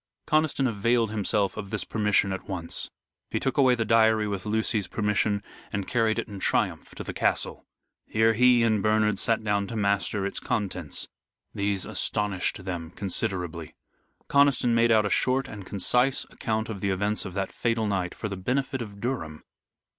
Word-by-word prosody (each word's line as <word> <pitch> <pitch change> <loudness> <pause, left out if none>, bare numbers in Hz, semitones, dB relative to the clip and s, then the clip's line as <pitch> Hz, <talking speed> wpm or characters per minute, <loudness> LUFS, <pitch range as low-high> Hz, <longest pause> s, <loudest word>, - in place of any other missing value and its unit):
Conniston 155 -3 +2
availed 115 0 +1
himself 100 -2 0
of 100 - -5
this 105 -3 -1
permission 105 -2 +1
at 95 - -7
once. 85 -3 -2 0.4
He - - -1
took 135 +2 -1
away 130 -2 +5
the 115 -2 -1
diary 110 -1 +4
with 100 0 -4
Lucy's 110 -2 +1
permission, 105 -1 0 0.3
and 100 -2 -3
carried 115 -2 +1
it - - -2
in 100 -3 -8
triumph - - -1
to - - -6
the - - -6
castle. - - -1 0.4
Here 110 +1 +3
he 125 +1 +5
and 110 -3 +2
Bernard 105 -1 +2
sat 115 -1 +1
down 100 -1 0
to 115 - -6
master 100 -1 0
its 100 - -2
contents. 95 - -2 0.5
These 100 -1 -1
astonished 100 -3 -1
them 85 -4 -4
considerably. 90 -4 -3 0.5
Conniston 140 -4 +4
made 115 0 +4
out 110 -2 +4
a 105 - -1
short 130 +1 +2
and 100 -6 -9
concise 125 +6 +2
account 110 0 -2
of 105 -4 -6
the 100 - 0
events 100 +3 0
of 95 -2 -7
that 100 -1 -2
fatal 115 -2 0
night, 95 -4 -1
for 110 - -4
the 100 - -4
benefit 130 +6 -1
of 100 -3 -8
Durham. 100 -11 -4
105 Hz, 175 wpm, -26 LUFS, 100-115 Hz, 0.5 s, away